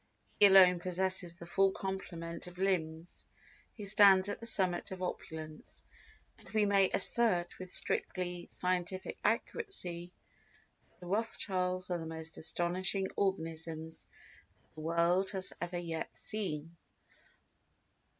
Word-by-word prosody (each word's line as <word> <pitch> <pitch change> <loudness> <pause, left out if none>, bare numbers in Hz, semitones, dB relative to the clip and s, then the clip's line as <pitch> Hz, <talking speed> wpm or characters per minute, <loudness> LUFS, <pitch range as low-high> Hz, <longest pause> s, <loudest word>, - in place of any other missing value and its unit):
He 205 - +9
alone 185 -2 +7
possesses 185 0 +1
the 170 - -10
full 195 +3 +2
complement 170 -3 -6
of 180 0 -12
limbs 170 -3 -3 0.5
who 205 -2 -8
stands 195 -1 +5
at - - -4
the 230 - -5
summit 185 -6 +3
of 185 -1 -6
opulence, 155 -3 -8 0.6
and - - -17
we 215 -1 +1
may 200 -2 +3
assert 185 -8 +3
with 185 0 -7
strictly 180 -1 -2
scientific 180 +1 -3
accuracy 180 - -2 0.8
that - - -32
the - - -10
Rothschilds 185 -3 0
are 175 - -1
the 160 - -6
most 160 0 -6
astonishing 180 +4 -1
organisms 160 -4 -3 0.7
that - - -36
the 155 - -10
world 170 +4 +1
has 190 -1 +2
ever 175 0 -3
yet 165 -2 -4 0.2
seen. 170 -6 -4
180 Hz, 125 wpm, -32 LUFS, 170-190 Hz, 0.8 s, He